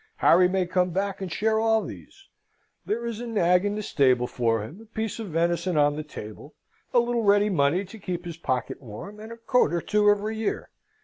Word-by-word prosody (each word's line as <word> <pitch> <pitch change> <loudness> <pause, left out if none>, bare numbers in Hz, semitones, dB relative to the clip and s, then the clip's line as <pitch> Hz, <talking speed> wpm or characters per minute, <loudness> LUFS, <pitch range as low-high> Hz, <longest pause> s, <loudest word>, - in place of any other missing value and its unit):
Harry 180 +1 +5
may 185 0 0
come 180 0 +1
back 195 +2 -2
and 185 -3 -4
share 220 +4 +1
all 225 0 +2
these: 390 -1 -11 0.6
there 235 +3 -1
is 230 -2 -4
a 240 - -5
nag 180 -5 +3
in 205 0 -1
the 215 - -4
stable 130 -8 +2
for 115 -3 0
him, 160 - -10
a - - -14
piece 220 0 -4
of 225 - -5
venison 170 +1 0
on 145 0 +3
the 155 - -3
table, 140 -2 -10 0.4
a - - +2
little 240 0 +2
ready 205 0 +3
money 170 +3 +2
to 220 +4 -12
keep 180 -3 -5
his 170 -2 -6
pocket 130 -7 -3
warm, 140 - -9
and 220 +1 -9
a 230 - -8
coat 230 -6 +2
or 170 - 0
two 210 +4 +2
every 205 +1 +1
year. 220 -1 -3
190 Hz, 215 wpm, -26 LUFS, 165-220 Hz, 0.6 s, Harry